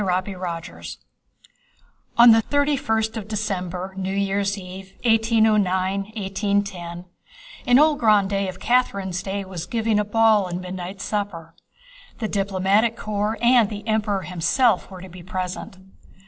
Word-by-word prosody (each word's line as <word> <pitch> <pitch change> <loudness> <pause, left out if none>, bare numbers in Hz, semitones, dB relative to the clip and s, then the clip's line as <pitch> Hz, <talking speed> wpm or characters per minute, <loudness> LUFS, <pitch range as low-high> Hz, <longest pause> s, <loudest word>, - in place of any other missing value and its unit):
CHAPTER 185 +1 -1
XIV 170 -2 -6 1.2
On 235 0 +9
the 225 0 +6
thirty 285 +4 +1
first 220 -2 -1
of 210 -2 -6
December, 190 -3 -3
New 190 0 -3
Year's 200 0 0
Eve, 190 0 -10
1809 205 -2 +1
10 175 -3 -8 0.6
an 245 - +6
old 300 0 +4
grandee 200 -3 +2
of 185 0 -7
Catherine's 200 -7 0
day 195 0 -4
was 180 -2 -6
giving 225 -2 0
a - - +2
ball 215 -1 +3
and 175 0 -4
midnight 185 +1 -7
supper. 190 -6 -4 0.6
The 220 - -2
diplomatic 200 +3 +1
corps 210 +1 -2
and 240 -3 +5
the 210 +1 -7
Emperor 210 -3 0
himself 180 +6 +1
were 185 -2 -10
to 190 - -9
be 180 +1 -11
present. 185 +1 -5
200 Hz, 135 wpm, -23 LUFS, 185-220 Hz, 1.2 s, On